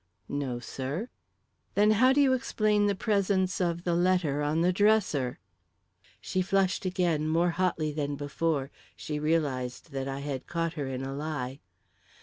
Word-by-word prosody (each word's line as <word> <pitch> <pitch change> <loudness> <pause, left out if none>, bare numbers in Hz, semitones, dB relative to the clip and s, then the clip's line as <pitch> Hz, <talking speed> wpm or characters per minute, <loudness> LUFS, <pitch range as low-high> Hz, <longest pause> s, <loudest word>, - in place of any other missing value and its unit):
"No, 140 -4 -2
sir." 135 - -4 0.7
"Then 210 +1 +5
how 255 +5 +5
do 275 - +3
you 270 -2 +4
explain 215 -4 +1
the 200 - +1
presence 195 -2 +1
of 170 -1 0
the 175 - 0
letter 175 -5 +2
on 150 +2 +1
the 180 +2 +3
dresser?" 195 - +2 0.8
She 185 - -1
flushed 190 0 +1
again, 175 -5 +1
more 170 +2 +2
hotly 170 -3 0
than 145 -1 -2
before; 145 0 -1 0.2
she 150 -1 -4
realised 150 -3 -1
that 135 -1 -3
I 135 0 -4
had 140 -2 -4
caught 165 -1 -1
her 145 -5 -4
in 130 0 -4
a 135 0 -4
lie. 140 -3 -4
165 Hz, 155 wpm, -29 LUFS, 140-185 Hz, 0.8 s, Then